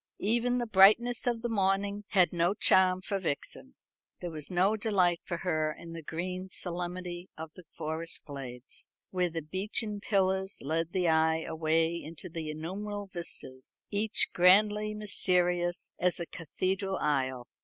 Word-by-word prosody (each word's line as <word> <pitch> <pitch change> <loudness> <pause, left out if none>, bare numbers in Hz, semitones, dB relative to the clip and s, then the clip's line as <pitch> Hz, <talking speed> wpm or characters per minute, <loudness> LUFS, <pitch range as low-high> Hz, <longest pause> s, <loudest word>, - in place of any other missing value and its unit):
Even 240 +4 +1
the 240 - -1
brightness 220 +4 +5
of 235 -1 0
the - - +1
morning 200 -1 0
had 185 -6 +3
no 175 +3 +2
charm 185 -2 +4
for 200 +1 -1
Vixen. 145 - -4 0.4
There 175 - -5
was 155 -2 -5
no 185 +4 +2
delight 190 -6 +2
for 170 - -4
her 155 -4 0
in 165 +2 -10
the 165 - -6
green 180 +4 -4
solemnity 180 0 -4
of 160 0 -7
the 180 - -14
forest 160 +2 -4
glades, 135 -3 -6 0.2
where 180 -1 +1
the 165 -1 -4
beechen 205 +5 -1
pillars 190 -1 0
led 165 +3 -1
the 180 -2 +1
eye 160 0 +3
away 165 +1 0
into 165 +2 -9
innumerable 190 +6 -5
vistas, 130 -7 -6
each 210 +1 +2
grandly 210 +4 +4
mysterious 180 -4 +1
as 180 0 +2
a 170 - -3
cathedral 190 +4 -2
aisle. 130 -4 -1
180 Hz, 145 wpm, -30 LUFS, 165-200 Hz, 0.4 s, brightness